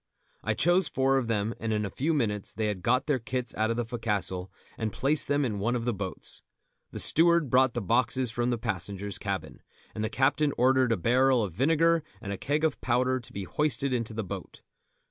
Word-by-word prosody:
I - - 0
chose 175 0 +3
four 135 0 +2
of 125 - -3
them, 110 0 0
and 115 - -2
in 105 -1 0
a 100 - -5
few 150 - -1
minutes 105 -9 -1
they 110 - -1
had 105 -3 -2
got 125 +6 +2
their 145 -4 +1
kits 125 +2 -3
out 110 +1 0
of 115 - -1
the 120 - -1
fo'castle 105 -5 -2 0.2
and 110 -1 -3
placed 140 +7 +1
them 145 0 +1
in 105 -5 -2
one 120 +5 0
of 115 -1 -2
the 120 - +1
boats. 100 -2 -7 0.5
The - - -8
steward 170 -4 +3
brought 130 -1 +4
the 120 - -2
boxes 120 +3 +1
from 120 +2 -1
the 120 - 0
passengers' 100 -2 -3
cabin, 100 -4 -4 0.3
and 105 - -4
the 110 - -1
captain 145 +4 +2
ordered 130 0 +3
a 115 - +2
barrel 125 +4 +3
of 95 -5 -4
vinegar 165 - +3 0.2
and 100 -3 -5
a - - -4
keg 150 +3 -1
of 160 -3 0
powder 130 +1 +1
to 120 - -11
be 100 - -5
hoisted 140 +2 0
into 115 -3 -2
the 110 - -2
boat. 95 - -8
120 Hz, 220 wpm, -28 LUFS, 105-135 Hz, 0.5 s, brought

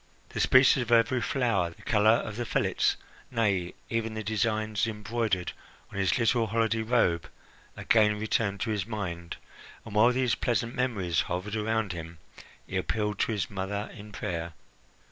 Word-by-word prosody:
The - - -5
species 130 +1 +6
of 120 -1 -4
every 115 +2 +4
flower, 115 -8 +1
the 85 - -16
colour 105 -1 +3
of 110 -2 +2
the 120 - -2
fillets - - +1 0.3
nay, 100 -7 0
even 115 -1 -2
the 110 - -4
designs 110 +1 0
embroidered 110 -3 -2 0.4
on 100 - -5
his 95 -4 +2
little 115 -1 +2
holiday 115 0 +1
robe 110 -8 +1 0.5
again 105 -2 +3
returned 105 -2 0
to 115 - -1
his 105 -2 -2
mind, 85 -6 -5 0.5
and, 110 - -9
while 110 +4 +5
these 125 -2 +1
pleasant 120 0 0
memories 105 -10 0
hovered 95 +5 -3
around 110 -2 0
him, 85 -1 -8 0.5
he 95 - -3
appealed 105 +5 -1
to - - +1
his 105 -5 -1
mother 100 +2 -3
in 105 -2 -11
prayer. 85 -4 -4
110 Hz, 160 wpm, -28 LUFS, 95-115 Hz, 0.5 s, species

